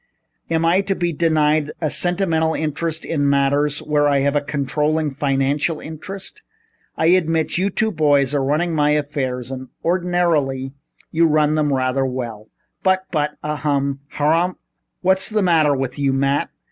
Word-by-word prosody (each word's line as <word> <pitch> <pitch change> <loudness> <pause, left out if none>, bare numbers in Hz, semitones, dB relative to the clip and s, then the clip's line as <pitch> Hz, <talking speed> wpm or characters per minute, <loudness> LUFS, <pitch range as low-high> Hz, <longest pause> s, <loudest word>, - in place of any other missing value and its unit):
Am 165 0 +1
I 175 +4 +4
to 195 0 -1
be 175 -2 -1
denied 155 -1 +1
a 155 -3 -1
sentimental 165 -3 +1
interest 160 +1 -3
in 145 -3 0
matters 140 +1 +1
where 150 -1 +2
I 140 -1 +2
have 140 +1 +1
a 145 - +2
controlling 150 +1 -1
financial 140 +3 0
interest? 185 +5 -9 0.6
I - - +1
admit 165 -2 +2
you 195 +2 +1
two 220 +3 0
boys 145 -5 +2
are 140 -2 +1
running 155 +5 0
my 150 -1 +2
affairs 135 -4 -2
and 130 0 -6 0.2
ordinarily 165 -7 0 0.4
you 165 +1 +3
run 150 -1 +2
them 150 -2 +1
rather 130 0 +1
well, 120 -5 -5 0.3
but 190 0 +2
but 150 -2 -1
ahem! 140 -2 -1 0.2
Harumph 165 +5 +2
h - - -30
h! - - -42 0.4
What's 190 +1 +2
the 215 -2 +1
matter 160 -5 +3
with 135 +1 -4
you, 140 -1 +1
Matt? 140 +1 +1
150 Hz, 160 wpm, -20 LUFS, 140-165 Hz, 0.6 s, I